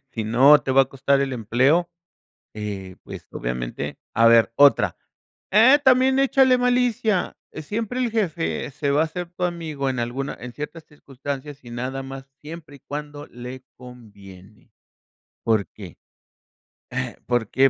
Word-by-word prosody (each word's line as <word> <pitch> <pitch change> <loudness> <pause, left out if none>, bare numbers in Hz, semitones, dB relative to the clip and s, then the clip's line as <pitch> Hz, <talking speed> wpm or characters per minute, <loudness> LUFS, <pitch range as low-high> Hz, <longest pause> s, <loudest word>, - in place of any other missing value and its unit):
Si 115 - -3
no 130 +7 +6
te 135 - -3
va 135 +1 +6
a - - 0
costar 140 +1 0
el 135 -1 -1
empleo, 130 +10 +2 0.6
eh, 100 -3 -6
pues, - - -10
obviamente, 60 0 -4 0.2
a 115 +1 +5
ver 115 -1 +5
otra 145 0 +5 0.6
eh, 245 +8 +7
también 260 +1 +4
échale 265 -2 +4
malicia. 245 -5 +1 0.2
Siempre 215 +10 -4
el 245 -2 0
jefe 155 - -2
se 140 0 -2
va 145 +3 +3
a - - -2
ser 175 +1 -6
tu 180 0 -4
amigo 160 -6 -3
en 130 -2 -2
alguna 130 +4 -3
en 125 0 -8
ciertas 155 +3 -7
circunstancias 140 -1 -8
y 120 - -11
nada 130 +3 -4
más, 135 0 -9
siempre 155 -1 -10
y - - -21
cuando 145 0 -7
le 125 +2 -9
conviene, 105 -5 -15 0.7
¿por 110 -3 +1
qué?, 95 -5 -12 1.1
eh, - - -8
¿por 120 -3 0
qué? 135 +1 +4
140 Hz, 155 wpm, -23 LUFS, 120-170 Hz, 1.1 s, eh